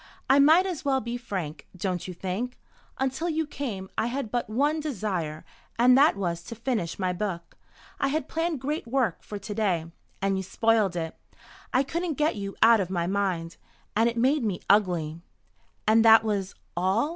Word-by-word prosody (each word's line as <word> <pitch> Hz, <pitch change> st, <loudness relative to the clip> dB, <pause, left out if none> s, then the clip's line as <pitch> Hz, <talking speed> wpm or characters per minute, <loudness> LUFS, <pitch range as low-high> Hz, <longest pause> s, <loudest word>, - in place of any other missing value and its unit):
"I 270 Hz, +2 st, +5 dB
might 320 Hz, +6 st, +6 dB
as 360 Hz, -5 st, -4 dB
well 270 Hz, -2 st, +2 dB
be 235 Hz, 0 st, -4 dB
frank, 190 Hz, -10 st, -5 dB
don't 180 Hz, -1 st, -2 dB
you 185 Hz, -, -5 dB
think? 195 Hz, +8 st, -4 dB, 0.4 s
Until 265 Hz, +6 st, -1 dB
you 320 Hz, 0 st, 0 dB
came 230 Hz, -10 st, -5 dB
I 225 Hz, -, +1 dB
had 240 Hz, -3 st, -3 dB
but 240 Hz, -2 st, -1 dB
one 290 Hz, +8 st, +1 dB
desire, 190 Hz, -, -3 dB, 0.3 s
and 250 Hz, +2 st, +6 dB
that 285 Hz, 0 st, +5 dB
was 175 Hz, -4 st, -2 dB
to 230 Hz, -, -7 dB
finish 225 Hz, -7 st, -2 dB
my 185 Hz, -2 st, 0 dB
book. 180 Hz, -3 st, -4 dB, 0.4 s
I 275 Hz, -, +2 dB
had 290 Hz, +1 st, -1 dB
planned 325 Hz, -4 st, -2 dB
great 290 Hz, 0 st, -3 dB
work 250 Hz, -1 st, 0 dB
for 210 Hz, -, -7 dB
to 205 Hz, +1 st, -6 dB
day. 180 Hz, -6 st, 0 dB, 0.3 s
And 195 Hz, 0 st, 0 dB
you -, -, -1 dB
spoiled 210 Hz, 0 st, +1 dB
it. 165 Hz, -2 st, -3 dB, 0.6 s
I 260 Hz, -, +3 dB
couldn't 335 Hz, +3 st, -2 dB
get 300 Hz, -2 st, +2 dB
you 200 Hz, -1 st, -5 dB
out 230 Hz, 0 st, +7 dB
of 185 Hz, -3 st, -1 dB
my 175 Hz, -3 st, -1 dB
mind. 180 Hz, -3 st, -1 dB, 0.4 s
And 225 Hz, +2 st, +4 dB
it 235 Hz, -, -6 dB
made 265 Hz, +4 st, +3 dB
me 200 Hz, -5 st, -2 dB
ugly." 175 Hz, -6 st, +2 dB, 0.6 s
"And 220 Hz, +1 st, +5 dB
that 225 Hz, 0 st, +8 dB
was 200 Hz, -3 st, -2 dB, 0.2 s
all?" 190 Hz, -, +1 dB
220 Hz, 185 wpm, -27 LUFS, 185-265 Hz, 0.6 s, that